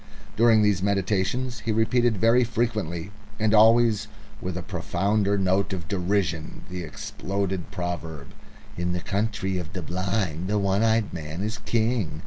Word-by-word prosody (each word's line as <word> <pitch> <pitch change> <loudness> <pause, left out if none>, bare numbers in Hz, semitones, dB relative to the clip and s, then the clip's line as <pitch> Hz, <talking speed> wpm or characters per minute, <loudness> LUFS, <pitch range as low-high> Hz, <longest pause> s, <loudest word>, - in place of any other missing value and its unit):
During 115 -1 +5
these 100 -3 +2
meditations 100 +5 0
he 110 - -2
repeated 115 +1 +2
very 115 +5 +4
frequently 105 -7 -2 0.3
and 110 0 +2
always 110 0 +5 0.3
with 90 -1 -3
a 90 - -4
profounder 100 +4 0
note 95 +1 +1
of 85 -3 -5
derision 90 -4 -1
the 90 0 -4
exploded 95 +3 -4
proverb: 80 -5 -5 0.5
"In 90 0 -1
the 90 - -2
Country 100 -2 -1
of 85 0 -7
the 95 -3 -4
Blind 95 -1 -2
the 105 +1 +1
One 100 0 +1
Eyed 110 -1 +2
Man 80 +2 -5
is 110 +2 -3
King." 110 -9 0
100 Hz, 145 wpm, -25 LUFS, 90-110 Hz, 0.5 s, During